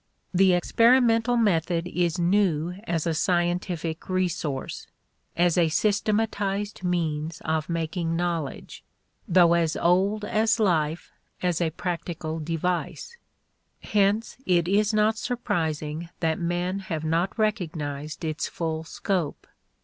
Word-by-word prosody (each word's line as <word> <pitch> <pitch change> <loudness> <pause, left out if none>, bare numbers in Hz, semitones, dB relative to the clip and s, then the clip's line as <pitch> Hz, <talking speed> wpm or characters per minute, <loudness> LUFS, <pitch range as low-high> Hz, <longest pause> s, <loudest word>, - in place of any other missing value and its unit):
The 185 0 +5
experimental 235 +5 +4
method 175 -6 +1
is 175 -1 0
new 175 -3 +2
as 165 -4 -1
a 165 - +1
scientific 175 -1 -1
resource 175 -7 -2 0.5
as 175 0 +3
a 165 -2 +3
systematized 205 +1 0
means 165 -3 -1
of 160 0 -1
making 165 0 -2
knowledge, 170 -5 -3 0.4
though 170 -1 +5
as 165 -2 +1
old 195 +5 +2
as 220 +1 +2
life 165 -6 +1 0.3
as 175 -1 +1
a 165 - +2
practical 165 -2 -4
device. 170 - -3 0.7
Hence 205 +2 +1
it 175 -2 +3
is 205 +3 +3
not 215 +1 +2
surprising 160 - -2
that 160 -2 0
men 175 +2 -1
have 165 -5 -4
not 165 +6 0
recognized 155 -9 -2
its 155 0 -2
full 160 -1 -3
scope. 170 -2 -3
175 Hz, 115 wpm, -26 LUFS, 160-200 Hz, 0.7 s, The